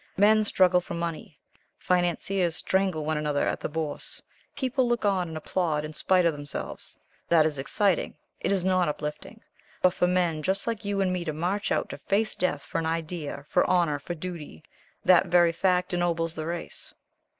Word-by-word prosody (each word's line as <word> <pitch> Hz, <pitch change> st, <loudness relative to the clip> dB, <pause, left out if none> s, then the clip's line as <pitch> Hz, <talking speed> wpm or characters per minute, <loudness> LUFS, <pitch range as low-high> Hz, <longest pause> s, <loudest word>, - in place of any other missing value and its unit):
Men 215 Hz, +2 st, +5 dB
struggle 185 Hz, -3 st, +3 dB
for 175 Hz, -, -6 dB
money. 170 Hz, -3 st, -5 dB, 0.4 s
Financiers 180 Hz, 0 st, +1 dB
strangle 190 Hz, -6 st, 0 dB
one 155 Hz, 0 st, 0 dB
another 150 Hz, -1 st, 0 dB
at -, -, -1 dB
the -, -, -4 dB
Bourse. 155 Hz, -1 st, -4 dB, 0.4 s
People 260 Hz, -1 st, 0 dB
look 240 Hz, -2 st, 0 dB
on 190 Hz, -3 st, +1 dB
and 160 Hz, -1 st, -6 dB
applaud, 155 Hz, -2 st, -1 dB
in 155 Hz, -, -7 dB
spite 180 Hz, +3 st, +2 dB
of 165 Hz, -, +3 dB
themselves. 145 Hz, -1 st, -7 dB, 0.3 s
That 165 Hz, -2 st, +5 dB
is 150 Hz, -3 st, -1 dB
exciting. 195 Hz, +7 st, +1 dB, 0.2 s
It -, -, -1 dB
is 190 Hz, -2 st, +1 dB
not 185 Hz, -3 st, +2 dB
uplifting. 150 Hz, +9 st, -6 dB, 0.4 s
But 180 Hz, -1 st, +5 dB
for 180 Hz, -, +2 dB
men 175 Hz, -3 st, +1 dB
just 190 Hz, +5 st, +2 dB
like 230 Hz, -2 st, -3 dB
you 200 Hz, -1 st, 0 dB
and 185 Hz, -1 st, +1 dB
me 180 Hz, -1 st, -2 dB
to 155 Hz, -, -2 dB
march 180 Hz, +7 st, -2 dB
out -, -, +1 dB
to -, -, -7 dB
face 215 Hz, +2 st, 0 dB
death 160 Hz, -6 st, -1 dB
for -, -, -3 dB
an 160 Hz, -, -2 dB
idea, 160 Hz, -3 st, -4 dB
for -, -, +3 dB
honor, 170 Hz, -5 st, +2 dB
for 175 Hz, +5 st, -5 dB
duty, 160 Hz, -, -7 dB, 0.4 s
that 185 Hz, 0 st, +6 dB
very 175 Hz, -1 st, +5 dB
fact 180 Hz, +1 st, +1 dB
ennobles 165 Hz, -2 st, 0 dB
the 155 Hz, -1 st, -5 dB
race." 170 Hz, 0 st, -6 dB
175 Hz, 185 wpm, -27 LUFS, 155-190 Hz, 0.4 s, that